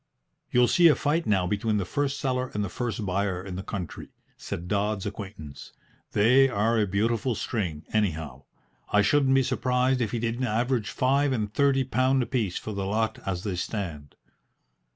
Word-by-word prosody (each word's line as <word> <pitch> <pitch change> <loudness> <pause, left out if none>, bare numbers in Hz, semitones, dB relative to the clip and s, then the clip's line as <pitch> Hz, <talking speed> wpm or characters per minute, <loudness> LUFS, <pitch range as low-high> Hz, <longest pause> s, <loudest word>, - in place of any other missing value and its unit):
"You'll 125 0 +4
see 175 +5 +6
a 155 - +6
fight 155 +3 0
now 95 -4 +2
between 105 +3 0
the 100 - -1
first 145 +4 -1
seller 130 -2 -1
and 105 -1 0
the - - -5
first 110 -4 -3
buyer 95 -1 -1
in 95 -2 -6
the 95 - -4
country," 95 -5 -6 0.3
said 85 +1 -6
Dodds's 105 0 -1
acquaintance. 95 -8 -8 0.4
"They 125 +6 +5
are 115 0 +1
a 105 - +2
beautiful 115 +5 0
string, 90 -9 -3
anyhow. 80 -10 -1 0.5
I 105 0 +4
shouldn't 135 +3 +3
be 135 - +4
surprised 130 0 +1
if 115 - 0
he 120 - -2
didn't 115 +2 -1
average 115 -1 0
five 135 +6 +2
and 105 -5 -2
thirty 140 0 +3
pound 130 +1 +2
apiece 110 -6 -1
for 110 - -5
the 100 -1 -3
lot 110 +2 -1
as 90 -2 -2
they 100 -4 -2
stand." 85 -7 -5
110 Hz, 175 wpm, -26 LUFS, 100-130 Hz, 0.5 s, see